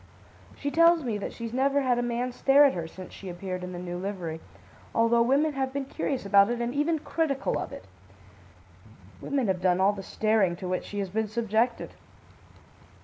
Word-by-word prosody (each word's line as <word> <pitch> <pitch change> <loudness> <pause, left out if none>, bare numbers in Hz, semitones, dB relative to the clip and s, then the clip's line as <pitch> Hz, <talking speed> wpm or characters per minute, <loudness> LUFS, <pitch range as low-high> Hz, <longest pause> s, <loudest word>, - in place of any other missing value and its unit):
She 285 - -3
tells 335 0 +5
me 225 -5 -2
that - - -4
she's 230 -1 -7
never 275 +2 +2
had 250 -2 +1
a - - +1
man 240 +1 -2
stare 275 +3 +5
at 275 - +3
her 170 -2 -4
since 185 +2 -11
she 195 - -9
appeared 185 +1 -5
in 180 - -5
the 180 - -6
new 175 0 -5
livery, 180 -5 -5 0.5
although 230 +1 +4
women 280 +6 +2
have 265 -1 -2
been 275 0 -3
curious 265 -2 -3
about 200 +1 +5
it 240 0 -2
and 240 +1 -2
even 300 +3 +1
critical 300 -3 -1
of - - -5
it. - - -9 1.4
Women 275 -3 -1
have 190 -3 -1
done 180 -1 +2
all 195 +2 +4
the 200 - -7
staring 210 -2 +1
to 180 +1 -7
which 185 0 -2
she 205 - -7
has 195 -2 -2
been 220 +2 -1
subjected. 225 +2 0
230 Hz, 200 wpm, -27 LUFS, 190-270 Hz, 1.4 s, tells